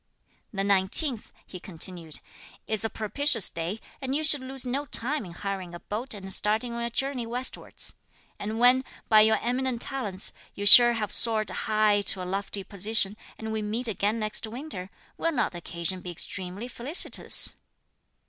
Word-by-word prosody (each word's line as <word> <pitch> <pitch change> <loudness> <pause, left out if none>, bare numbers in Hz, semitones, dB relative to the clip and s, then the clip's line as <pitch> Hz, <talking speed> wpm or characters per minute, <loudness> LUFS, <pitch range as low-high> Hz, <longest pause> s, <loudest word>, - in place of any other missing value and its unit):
"The 195 -2 -3
nineteenth," 200 - +1
he 180 - -10
continued, 170 -3 -4 0.4
"is 220 -1 -2
a 225 - 0
propitious 225 +2 +3
day, 170 +6 -5 0.2
and 265 0 -2
you 310 - 0
should 300 -3 +2
lose 265 0 -6
no 275 +4 -3
time 270 +1 0
in 175 - -10
hiring 185 -1 -6
a - - -9
boat 220 +6 -6
and 190 -1 -6
starting 220 +5 0
on 235 - -4
your 235 - -2
journey 255 -1 -3
westwards. 250 +2 -3 0.5
And 215 +2 -4
when, 250 +2 +5 0.3
by 215 -1 +7
your 220 0 +4
eminent 250 0 -1
talents, 210 -9 -3 0.2
you 205 - -5
shall 240 +3 +9
have 210 -3 -3
soared 215 -4 +5
high 215 +1 +1
to 190 -2 +3
a - - -6
lofty 195 +1 -3
position, 205 +1 +3 0.2
and 220 0 -6
we 220 0 -3
meet 220 +4 -1
again 210 0 -1
next 215 0 -1
winter, 220 -6 -8 0.3
will 330 - 0
not - - 0
the 175 - -8
occasion 170 +2 -3
be 180 - -8
extremely 185 +5 -4
felicitous?" 255 +7 +2
215 Hz, 170 wpm, -26 LUFS, 195-245 Hz, 0.5 s, shall